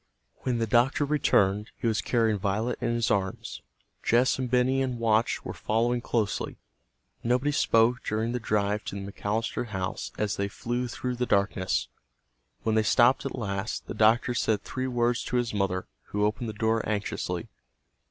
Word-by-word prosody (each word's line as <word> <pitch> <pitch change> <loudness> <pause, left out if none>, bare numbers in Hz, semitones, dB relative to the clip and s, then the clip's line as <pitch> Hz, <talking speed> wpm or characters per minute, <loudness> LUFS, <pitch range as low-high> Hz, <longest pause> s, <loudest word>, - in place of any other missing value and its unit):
When 125 -2 0
the 115 - +1
doctor 120 +6 +3
returned 105 -8 +2
he - - -6
was 110 -4 +2
carrying 110 -1 +1
Violet 105 +5 -1
in 120 0 0
his 115 -2 +1
arms. 95 -10 -2 0.4
Jess 125 +3 +3
and 130 -1 -2
Benny 130 +2 +2
and 130 -2 -1
Watch 115 0 +1
were - - -4
following 120 +2 0
closely. 110 -4 -1 0.7
Nobody 125 +5 +2
spoke 120 -3 +3
during 110 +2 -1
the 125 - -1
drive 105 -2 0
to - - -5
the 100 - -7
McAllister 110 +4 -2
house 95 -4 -4
as 105 -1 -1
they 100 - 0
flew 120 +4 -3
through 125 +1 -4
the 125 0 -1
darkness. 100 -2 +1 0.8
When 110 - +1
they 110 - +4
stopped 120 +5 +4
at - - -5
last, 100 -1 -3
the - - -6
doctor 115 +3 +3
said 110 -3 0
three 130 0 -3
words 120 -1 +1
to - - -3
his 120 -2 0
mother, 95 -2 0 0.2
who 105 0 0
opened 110 +2 -1
the - - -5
door 110 +1 +1
anxiously. 105 -1 -2
115 Hz, 170 wpm, -27 LUFS, 105-120 Hz, 0.8 s, they